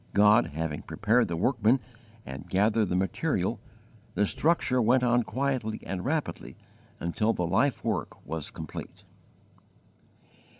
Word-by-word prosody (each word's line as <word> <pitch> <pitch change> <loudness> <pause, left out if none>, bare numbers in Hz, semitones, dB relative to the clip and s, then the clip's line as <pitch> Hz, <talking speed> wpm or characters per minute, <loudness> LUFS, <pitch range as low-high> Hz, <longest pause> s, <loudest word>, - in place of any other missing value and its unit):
God 105 +3 +5
having 80 -2 -3
prepared 115 +4 +1
the 85 - -3
workman 120 +4 +3 0.5
and 65 +2 -8
gathered 105 +1 +2
the 90 - 0
material, 95 -1 0 0.6
the 105 - +3
structure 135 - +1
went 125 +3 +3
on 120 0 +3
quietly 120 -2 -2
and 95 -2 -4
rapidly 155 +1 -3 0.4
until 105 +7 0
the 90 - -1
life 130 +10 +1
work - - -3
was 80 -2 -4
complete. - - -8
110 Hz, 125 wpm, -28 LUFS, 90-125 Hz, 0.6 s, God